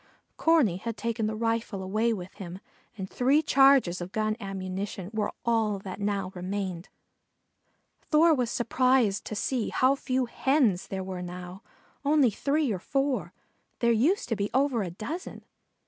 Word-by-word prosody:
Corney 305 - +3
had 225 +3 -5
taken 225 0 -1
the 215 - -2
rifle 225 -3 -1
away 215 +5 +1
with 185 -4 -5
him 185 -2 -8 0.4
and 190 -2 -4
three 270 +9 +2
charges 270 - +4
of 175 +1 -6
gun 215 0 0
ammunition 195 -1 -5
were 215 -1 -1
all 225 -3 +2
that 190 0 -8
now 200 -2 -1
remained. 185 -1 -4 1.2
Thor 320 +1 +5
was 250 -5 0
surprised 240 -3 +2
to 215 - -5
see 235 +2 -1
how 260 +1 +3
few 260 -2 -1
Hens 245 -6 +1
there 190 -1 -4
were 185 -1 -5
now, 180 +1 -7 0.4
only 285 -4 +4
three 280 +4 0
or 190 - -2
four. 270 +5 -1 0.5
There 235 -1 +2
used 280 - +2
to 225 - +1
be 205 0 -2
over 265 -4 +2
a 185 - -3
dozen. 255 - -7
215 Hz, 155 wpm, -28 LUFS, 190-260 Hz, 1.2 s, Thor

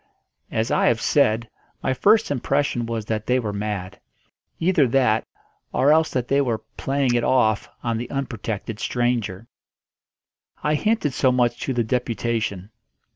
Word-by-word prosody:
As 115 +1 -1
I - - +3
have 115 -1 +3
said, 115 -4 +2 0.4
my 130 - +1
first 210 - +3
impression 135 -3 0
was 115 -2 -3
that 110 0 -3
they 125 - +3
were 110 -5 -2
mad; 100 -2 -4 0.6
either 165 -5 +3
that, 120 -3 +2 0.4
or 140 +3 +3
else 160 +1 +4
that 125 -2 -2
they 140 +1 +3
were 115 -5 -1
"playing 135 -2 0
it 120 -1 +1
off" 110 -5 +2
on 115 -1 -1
the 120 - -5
unprotected 115 -5 -4
stranger. 120 -5 -1 1.2
I 150 - +2
hinted 180 - +1
so 130 0 +3
much 120 -1 +1
to 135 - -2
the 120 -1 +1
deputation. 115 -4 -2
120 Hz, 150 wpm, -23 LUFS, 110-135 Hz, 1.2 s, else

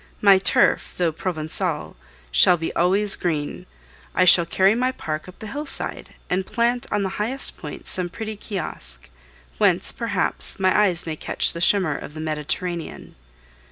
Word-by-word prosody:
My 200 -2 +6
turf, - - +2
though 175 -2 +1
Provencal, 160 0 -4 0.4
shall - - +6
be 165 - -4
always 195 +4 +2
green. 155 -4 -3 0.5
I 185 - +4
shall 170 -1 +8
carry 190 +4 +3
my 250 +3 0
park 155 -10 -5
up 185 - -14
the - - -9
hillside 285 +7 -4
and 185 +1 0
plant 235 +4 -1
on 205 - 0
the 190 - -1
highest 260 +6 -1
point - - -9
some 180 -1 +2
pretty 220 +4 -6
kiosque, 60 - -7 0.5
whence, - - +2
perhaps, - - -2
my 185 -1 +2
eyes 185 -5 +3
may 160 -2 -4
catch - - 0
the 170 - -6
shimmer 180 -5 +3
of 150 - -8
the - - -7
Mediterranean. 160 +2 -4
180 Hz, 160 wpm, -22 LUFS, 160-205 Hz, 0.5 s, shall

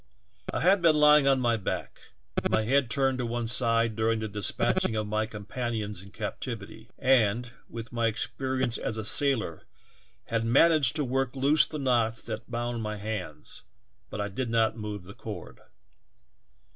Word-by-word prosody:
"I - - -2
had 190 +2 +4
been 165 -2 +5
lying 150 -1 +6
on 135 -1 +4
my 120 -2 +2
back, 100 - -4 0.4
with - - 0
my 110 - +2
head 130 +2 +2
turned 135 0 +1
to 125 - -1
one 120 0 -2
side 115 -1 +2
during 115 +1 +1
the 110 0 -3
despatching 105 +2 0
of 110 0 -1
my 110 +1 -1
companions 105 -1 -4
in 100 - -13
captivity, 110 +1 -6
and, 120 -2 +2 0.2
with 115 0 -7
my 115 -1 +1
experience 130 +2 -1
as 110 - -3
a 110 - -4
sailor, 115 - +1 0.6
had 115 0 -1
managed 140 +3 +4
to 150 - +1
work 130 +1 -1
loose 140 +3 +4
the 155 - -6
knots 120 -5 +1
that 110 +1 -6
bound 120 0 -3
m}^ 105 0 -4
hands, 100 -8 -5 0.5
but 105 - -6
I 105 - -1
did 120 +5 -4
not 115 -1 +2
move 105 -4 -6
the 95 +3 -11
cord. 105 -6 -8
115 Hz, 170 wpm, -28 LUFS, 110-130 Hz, 0.6 s, lying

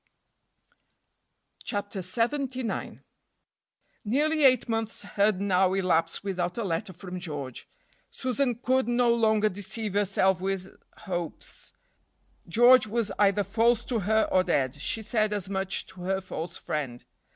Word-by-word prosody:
CHAPTER 205 -2 -4
LXXIX. 245 +5 -2 1.0
NEARLY 295 +7 +2
eight 255 -2 +5
months 225 -2 -2
had 200 -1 +1
now 190 -1 +2
elapsed 170 -3 +1
without 180 -2 -2
a 230 - -1
letter 190 +2 -2
from 180 0 -8
George. 145 -8 -6 0.4
Susan 255 -1 -1
could 255 +2 +1
no 240 0 +3
longer 220 -2 +3
deceive 205 +1 -4
herself 190 -2 +2
with 190 0 -3 0.3
hopes. 175 -4 -6 0.7
George 240 +5 +6
was 220 -1 -1
either 205 0 +4
false 225 +4 +2
to 240 -3 -1
her 220 +3 +2
or 185 - +4
dead. 135 -8 +1
She 220 - -1
said 215 -1 +1
as 200 -3 -3
much 190 0 -2
to 190 -1 -13
her 190 +2 0
false 175 -3 -6
friend. 130 -5 -4
205 Hz, 130 wpm, -27 LUFS, 185-230 Hz, 1.0 s, George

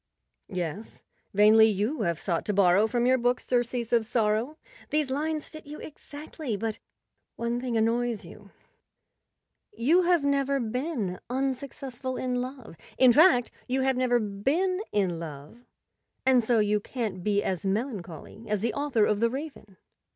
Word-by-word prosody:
Yes, 185 +4 -5 0.3
"vainly 215 +2 +6
you 220 +7 -1
have 170 -4 -1
sought 170 -4 -1
to 210 - -1
borrow 195 +2 +4
from 240 +1 0
your 260 +1 +4
books 245 +1 0
surcease 240 -1 -1
of 230 -1 +4
sorrow." 225 +5 0 0.3
These 300 -3 0
lines 305 +2 -2
fit 310 -1 -12
you 300 +1 -8
ex¬ 300 - -12
actly, 290 -6 -5
but 220 0 -3 0.6
one 235 +1 -2
thing 245 -3 -1
annoys 230 -2 0
you. 200 +4 -13 1.2
You 335 - +3
have 350 -3 +3
never 280 -1 +1
been 240 - -3
unsuccessful 260 -1 -3
in 250 -1 -1
love—in 255 - 0
fact, 295 -5 +5 0.2
you 260 +1 0
have 265 0 +2
never 250 -1 +2
been 275 - 0
in 185 -5 0
love, 155 - -10 0.6
and 255 -2 +5
so 235 +1 +2
you 210 -1 +2
can't 205 -5 -4
be 205 0 +1
as 185 -3 -2
melancholy 200 - -4
as 210 -2 -1
the 235 - 0
author 285 -7 +1
of 210 -1 +1
"The 230 +1 +3
Raven." 265 -7 -7
240 Hz, 150 wpm, -27 LUFS, 210-265 Hz, 1.2 s, vainly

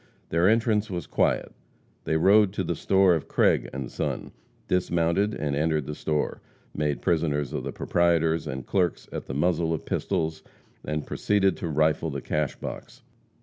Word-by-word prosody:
Their 85 +3 +3
entrance 110 -1 +2
was 90 -4 -4
quiet. - - 0 0.5
They 80 - +1
rode 100 +3 +5
to 95 - -1
the 85 - -1
store 95 +2 +3
of 80 - -2
Craig - - +2
& 65 - -4
Son; - - -3 0.4
dismounted 90 +3 +1
and 75 -2 -2
entered 75 -1 0
the 75 - -4
store; 75 0 -2 0.3
made 75 -1 -1
prisoners 75 -5 0
of - - -3
the - - -4
proprietors 85 -2 +1
and 65 -1 -5
clerks 90 -4 0
at - - -6
the 65 - -5
muzzle 80 +1 +1
of - - -8
pistols, 80 -1 -1 0.4
and 75 -1 -3
proceeded 95 -3 +1
to - - -4
rifle 80 +1 +1
the 70 -1 -4
cash 75 0 -2
box. - - -8
80 Hz, 165 wpm, -26 LUFS, 75-90 Hz, 0.5 s, rode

